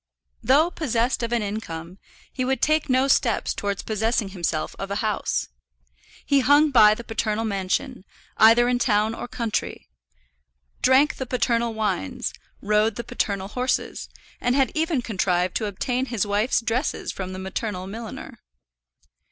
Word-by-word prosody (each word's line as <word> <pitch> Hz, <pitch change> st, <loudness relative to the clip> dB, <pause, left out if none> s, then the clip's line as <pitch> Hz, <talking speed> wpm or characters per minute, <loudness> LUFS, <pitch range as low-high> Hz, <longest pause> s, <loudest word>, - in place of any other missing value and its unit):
Though 290 Hz, +8 st, +4 dB
possessed 245 Hz, -7 st, 0 dB
of 235 Hz, 0 st, -2 dB
an 235 Hz, -2 st, +1 dB
income, 185 Hz, -4 st, -6 dB, 0.3 s
he 255 Hz, -, -2 dB
would 265 Hz, +1 st, 0 dB
take 310 Hz, -1 st, +1 dB
no 260 Hz, +1 st, +3 dB
steps 240 Hz, -4 st, +2 dB
towards 200 Hz, -1 st, -3 dB
possessing 220 Hz, 0 st, 0 dB
himself 170 Hz, -4 st, -3 dB
of 195 Hz, -, -4 dB
a 200 Hz, -, -2 dB
house. 210 Hz, -1 st, -1 dB, 0.8 s
He 280 Hz, -1 st, +3 dB
hung 290 Hz, +3 st, +4 dB
by 215 Hz, -4 st, +7 dB
the 235 Hz, -, -8 dB
paternal 225 Hz, 0 st, -2 dB
mansion, 200 Hz, +4 st, -2 dB, 0.3 s
either 230 Hz, +2 st, +6 dB
in 245 Hz, 0 st, +1 dB
town 215 Hz, -2 st, +2 dB
or 230 Hz, -, -6 dB
country; 230 Hz, -3 st, -3 dB, 0.9 s
drank 265 Hz, +3 st, +4 dB
the 260 Hz, -, -4 dB
paternal 235 Hz, -2 st, 0 dB
wines, 200 Hz, -, -2 dB, 0.3 s
rode 210 Hz, +1 st, +2 dB
the 235 Hz, -, -4 dB
paternal 200 Hz, -3 st, -2 dB
horses, 250 Hz, +3 st, -2 dB, 0.3 s
and 245 Hz, +1 st, +1 dB
had 270 Hz, -2 st, +2 dB
even 315 Hz, -5 st, 0 dB
contrived 180 Hz, -4 st, 0 dB
to 215 Hz, -, -2 dB
obtain 250 Hz, +6 st, -2 dB
his 225 Hz, -5 st, -1 dB
wife's 205 Hz, +5 st, +1 dB
dresses 235 Hz, +5 st, -2 dB
from 185 Hz, -1 st, -6 dB
the 185 Hz, -, -6 dB
maternal 190 Hz, 0 st, -4 dB
milliner. 220 Hz, +3 st, -8 dB
225 Hz, 150 wpm, -24 LUFS, 200-255 Hz, 0.9 s, by